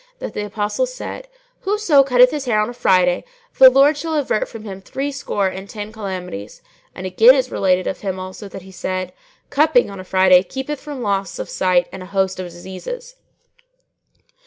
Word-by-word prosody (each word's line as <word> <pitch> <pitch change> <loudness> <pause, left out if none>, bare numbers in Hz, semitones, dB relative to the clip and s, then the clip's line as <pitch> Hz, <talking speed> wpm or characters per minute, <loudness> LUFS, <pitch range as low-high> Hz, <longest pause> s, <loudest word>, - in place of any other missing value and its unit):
that - - -6
the 210 - -3
Apostle 210 - -1
said, - - -7 0.3
'Whoso 385 -8 +3
cutteth 250 -1 +5
his 295 -3 -4
hair 220 -4 +2
on 215 +3 0
a - - -10
Friday, 185 -6 +2 0.4
the 260 - +11
Lord 275 +4 +5
shall 320 +2 -3
avert 275 -7 0
from 225 -2 -9
him 195 -3 -8
threescore 270 -4 -2
and 190 +1 -6
ten 210 -1 -7
calamities;' 185 - -7 0.3
and 185 - -7
again 220 +8 +6
is 260 -2 -1
related 185 -1 +1
of - - -3
him 190 -2 -3
also 185 +2 -8
that 195 -1 -9
he 190 - -13
said, 185 -1 -4 0.4
'Cupping 305 - +3
on 195 - -9
a - - -7
Friday 185 -1 +5
keepeth 265 +9 -5
from 290 -4 -6
loss 200 -2 -1
of - - -6
sight 180 -1 +2
and 190 - -8
a 185 - -9
host 190 -1 -1
of 185 - -4
diseases.'" 190 - -8
205 Hz, 185 wpm, -20 LUFS, 185-275 Hz, 0.4 s, the